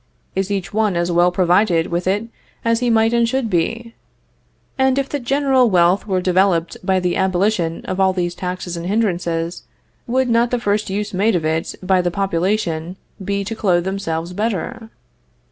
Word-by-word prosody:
Is 195 0 -1
each 195 -3 -3
one 215 -3 +1
as 175 +1 0
well 175 +1 +4
provided 180 -1 +2
with 175 +1 -1
it 200 +3 +1 0.4
as 230 0 +2
he 245 -1 0
might 225 0 +3
and 235 -1 +2
should 260 -3 -1
be? 230 +7 -1 0.8
And 265 0 +2
if 275 -1 0
the 290 - -3
general 265 -1 +2
wealth 180 +2 +3
were 190 -2 +1
developed 180 -2 +2
by 190 0 +2
the 180 -1 -1
abolition 185 -2 0
of 185 +1 -3
all 190 0 +4
these 175 -2 -2
taxes 180 -1 -5
and 170 +1 -5
hindrances, 175 -5 -1 0.5
would 260 +2 +1
not 235 0 +2
the 245 - 0
first 210 -2 0
use 205 +2 -3
made 205 +3 +2
of 165 -3 -1
it 160 +1 -1
by 185 0 +3
the 175 - 0
population 180 -2 -1 0.3
be 200 +1 -1
to 225 +3 -5
clothe 180 -5 +1
themselves 180 -3 -3
better? 225 +3 -3
190 Hz, 180 wpm, -19 LUFS, 175-225 Hz, 0.8 s, well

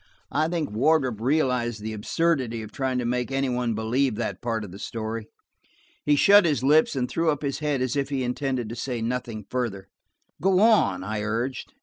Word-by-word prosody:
I 155 +2 +1
think 165 -5 -2
Wardrop 130 -1 +2
realized 125 -4 +1
the 110 +1 -5
absurdity 120 0 0
of 105 - -10
trying 130 -2 -1
to 125 - -1
make 125 +2 -1
any 135 0 0
one 125 -2 -1
believe 120 +3 0
that - - -3
part 115 -2 -2
of 100 - -8
the 95 - -10
story. 110 0 -4 0.8
He 150 - +3
shut 205 +7 +7
his 150 -7 +1
lips 150 +2 +4
and 125 -2 0
threw 165 +4 0
up 150 -1 -1
his 140 -1 -2
head 145 -4 0
as 130 +1 -1
if 140 -1 -1
he 135 -2 -1
intended 125 -1 -2
to 115 - -5
say 120 0 -3
nothing 115 -3 -3
further. 115 -7 -3 0.5
"Go 190 +1 +3
on," 210 - +4
I 105 +1 -3
urged. 115 - -3
125 Hz, 200 wpm, -25 LUFS, 115-145 Hz, 0.8 s, shut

